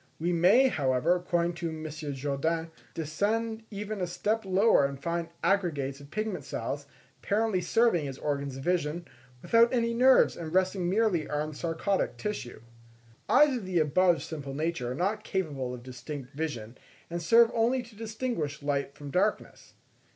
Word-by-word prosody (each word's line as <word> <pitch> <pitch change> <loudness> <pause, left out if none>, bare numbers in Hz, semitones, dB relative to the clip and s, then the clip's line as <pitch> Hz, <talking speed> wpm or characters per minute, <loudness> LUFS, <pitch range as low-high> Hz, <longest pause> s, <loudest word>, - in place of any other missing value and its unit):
We 175 +2 0
may, 190 +11 +5
however, 145 - +2
according 175 -1 0
to 170 - -2
M. 160 0 -6
Jourdain, 150 +2 -2 0.2
descend 220 +8 -1
even 210 -1 -5
a 180 - 0
step 215 +5 -1
lower 195 -3 +4
and 140 0 -2
find 170 +2 -2
aggregates 145 -9 0
of 140 0 -13
pigment 215 +5 -3
cells, - - -4 0.3
apparently 210 -2 +1
serving 180 -4 +2
as 135 -1 -6
organs 140 -2 -3
of 135 - -7
vision, 170 -1 -1 0.4
without 230 0 +5
any 235 -2 +1
nerves, 255 +2 +5
and 160 -2 -6
resting 185 0 +1
merely 195 -5 +1
on 150 +1 -2
sarcodic 170 +6 -1
tissue. 210 - -5 0.7
Eyes 295 -3 +6
of 220 - -7
the 185 -2 0
above 165 +3 +3
simple 140 -4 -6
nature 150 -5 -2
are - - -3
not 205 +7 -1
capable 145 -12 -2
of 125 -1 -8
distinct 130 +1 -8
vision, 130 -7 -5 0.3
and 170 0 -4
serve 230 +7 +5
only 240 +3 +2
to 235 -2 -16
distinguish 215 - -3
light 140 -1 -1
from 145 -1 -8
darkness. 200 +7 -1
170 Hz, 160 wpm, -29 LUFS, 145-210 Hz, 0.7 s, Eyes